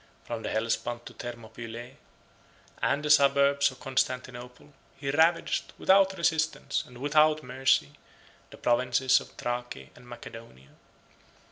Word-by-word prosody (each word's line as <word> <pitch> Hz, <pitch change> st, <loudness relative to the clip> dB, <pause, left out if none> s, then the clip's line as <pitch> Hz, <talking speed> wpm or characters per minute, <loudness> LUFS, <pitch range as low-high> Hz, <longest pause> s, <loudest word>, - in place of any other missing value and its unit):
From 115 Hz, -1 st, -5 dB
the -, -, -4 dB
Hellespont 115 Hz, +2 st, -2 dB
to -, -, -10 dB
Thermopylae, 120 Hz, +1 st, -8 dB, 0.9 s
and 145 Hz, +2 st, 0 dB
the 150 Hz, -, +2 dB
suburbs 140 Hz, -1 st, +4 dB
of 130 Hz, -, -13 dB
Constantinople, 130 Hz, +1 st, -3 dB, 0.2 s
he 135 Hz, 0 st, -3 dB
ravaged, 165 Hz, +3 st, +1 dB
without 190 Hz, 0 st, +4 dB
resistance, 160 Hz, -2 st, 0 dB
and 125 Hz, -, -14 dB
without 155 Hz, +3 st, +3 dB
mercy, 125 Hz, -, +1 dB, 0.6 s
the -, -, -13 dB
provinces 125 Hz, +2 st, +2 dB
of -, -, -12 dB
Thrace 120 Hz, -, -5 dB
and 125 Hz, 0 st, -16 dB
Macedonia. 115 Hz, -, -11 dB
130 Hz, 120 wpm, -28 LUFS, 120-145 Hz, 0.9 s, suburbs